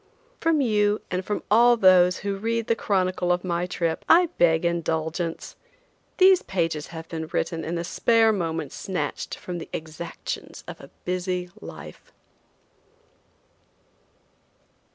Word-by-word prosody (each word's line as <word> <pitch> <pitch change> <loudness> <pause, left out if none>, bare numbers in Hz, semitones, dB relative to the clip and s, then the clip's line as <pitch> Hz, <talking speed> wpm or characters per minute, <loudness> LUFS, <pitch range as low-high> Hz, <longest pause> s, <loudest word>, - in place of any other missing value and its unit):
From 325 -2 +2
you 210 -4 +2
and 185 0 -1
from 205 +2 -3
all 240 +2 +6
those 185 -3 +5
who 200 -1 -1
read 230 +2 -1
the 230 -1 +1
chronicle 185 -4 0
of 180 0 0
my 175 -1 -1
trip 170 -2 -2
I 345 +1 +6
beg 165 -1 +4
indulgence. 165 0 -2 0.6
These 375 -1 +6
pages 165 -5 -2
have 160 -1 -9
been 160 -1 -5
written 165 +1 -2
in 170 - -3
the 170 - -2
spare 225 +5 +3
moments 165 -6 -3
snatched 190 -2 -4
from 175 -1 -6
the - - -9
exactions 160 +1 -6
of - - -9
a - - -13 0.2
busy 180 0 -2
life. - - -11
180 Hz, 130 wpm, -25 LUFS, 165-210 Hz, 0.6 s, all